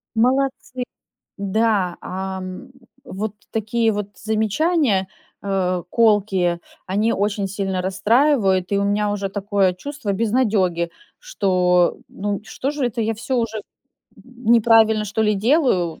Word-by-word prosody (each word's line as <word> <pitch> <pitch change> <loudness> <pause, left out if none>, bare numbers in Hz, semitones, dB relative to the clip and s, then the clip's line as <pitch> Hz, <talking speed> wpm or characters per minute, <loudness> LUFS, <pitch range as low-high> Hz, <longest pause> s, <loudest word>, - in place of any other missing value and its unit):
Молодцы!" 255 +1 0 0.5
Да, 200 -2 0
ам, 190 +2 -6 0.3
вот 215 -4 -4 0.2
такие 225 +1 +1
вот 205 -1 -4
замечания, 220 - +1 0.4
э, 185 -2 0
колкие- 200 -6 +2 0.3
они 210 +5 +1
очень 205 0 -1
сильно 195 -1 -2
расстраивают. 200 -1 +2
И 200 - +3
у - - +1
меня 205 +1 +1
уже 200 -1 -2
такое 200 -1 +1
чувство 280 +3 -5
безнадеги, 200 -6 +1 0.3
что, 180 - +2
ну, 205 0 -3
что 265 +5 -3
же 290 -4 -1
это 235 -1 -3
я 225 +1 0
всё 235 +4 -3
уже 230 -2 -1
н - - -7 0.9
неправильно 225 -2 +5
что 215 +2 -1
ли 210 -1 +2
делаю? 205 - +1
210 Hz, 125 wpm, -21 LUFS, 190-230 Hz, 0.9 s, неправильно